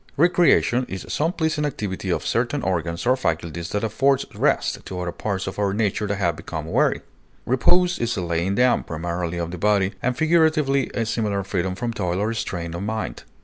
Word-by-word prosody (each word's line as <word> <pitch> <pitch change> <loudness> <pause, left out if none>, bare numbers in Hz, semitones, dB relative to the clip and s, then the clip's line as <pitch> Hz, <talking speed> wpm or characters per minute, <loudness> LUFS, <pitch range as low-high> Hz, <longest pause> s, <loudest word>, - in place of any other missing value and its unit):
Recreation 155 -6 +4
is 95 - -5
some 160 +3 +1
pleasing 160 -3 -1
activity 100 -9 -3
of 90 - -1
certain 125 +5 0
organs 85 -1 -1
or 125 +1 +4
faculties 85 - -2
that 105 - -2
affords 135 +5 +2
rest - - +1
to 90 - -5
other 90 -1 -2
parts 95 +1 -3
of 95 - -5
our 100 -1 +1
nature 105 -1 0
that 105 - -1
have 85 -5 0
become 80 -1 -6
weary. 80 - +1 0.4
Repose 175 +8 +3
is 115 -1 -1
a - - 0
laying 85 +3 0
down, 125 +1 +4
primarily 85 +1 -3
of 85 -1 -3
the 90 - -6
body, 100 0 +2
and 125 0 0
figuratively 155 -4 +3
a 115 - 0
similar 105 -3 -1
freedom 95 -1 -2
from 115 +3 -3
toil 90 -5 -1
or 110 +3 0
strain 85 -6 -4
of 85 - -4
mind. 110 +2 -4
105 Hz, 190 wpm, -23 LUFS, 90-125 Hz, 0.4 s, Recreation